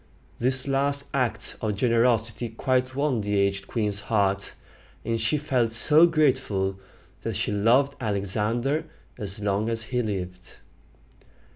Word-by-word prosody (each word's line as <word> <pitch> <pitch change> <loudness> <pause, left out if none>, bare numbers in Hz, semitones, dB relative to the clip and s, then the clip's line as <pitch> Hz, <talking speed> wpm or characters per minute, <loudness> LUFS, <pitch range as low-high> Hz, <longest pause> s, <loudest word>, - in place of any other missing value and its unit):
This 130 +2 +4
last 140 +1 0
act 130 -4 -1
of 105 -2 -2
generosity 115 0 +1
quite 130 +2 -1
won 140 -5 0
the 105 0 -1
aged 100 0 0
queen's 105 -3 -1
heart; 100 -3 -1 0.5
and 115 0 -1
she 110 +7 +1
felt 130 -6 0
so 150 +8 +6
grateful, 130 - 0 0.4
that - - -4
she - - -1
loved 120 +7 +2
Alexander 110 - -1 0.3
as 100 -1 -3
long 105 +2 -1
as 115 -1 -2
he 125 +3 -2
lived. 90 -4 -6
115 Hz, 130 wpm, -25 LUFS, 105-130 Hz, 0.5 s, so